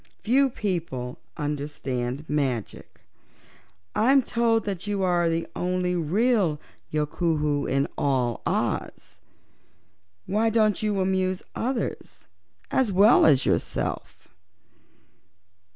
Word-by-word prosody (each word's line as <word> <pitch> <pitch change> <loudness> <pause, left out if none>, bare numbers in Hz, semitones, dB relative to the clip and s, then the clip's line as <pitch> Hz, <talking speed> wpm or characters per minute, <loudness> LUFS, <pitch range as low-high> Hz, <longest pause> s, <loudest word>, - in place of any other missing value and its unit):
Few 265 +5 +3
people 165 - -4 0.2
understand 145 -2 -3
magic. 135 -7 -3 0.9
I'm 265 +4 +4
told 230 -1 +1
that 195 -1 -4
you 200 -2 -1
are 175 -2 +2
the 165 0 -1
only 180 0 -1
real 180 0 +1 0.3
Yookoohoo 150 -1 0
in 135 +1 +1
all 125 -4 0
Oz. - - -3 1.1
Why 220 +3 +1
don't 215 -1 +2
you 210 -2 0
amuse 185 -1 0
others 250 0 -4 0.5
as 255 -6 +2
well 200 +2 +6
as 140 -3 +4
yourself?" - - -2
180 Hz, 95 wpm, -25 LUFS, 150-215 Hz, 1.1 s, well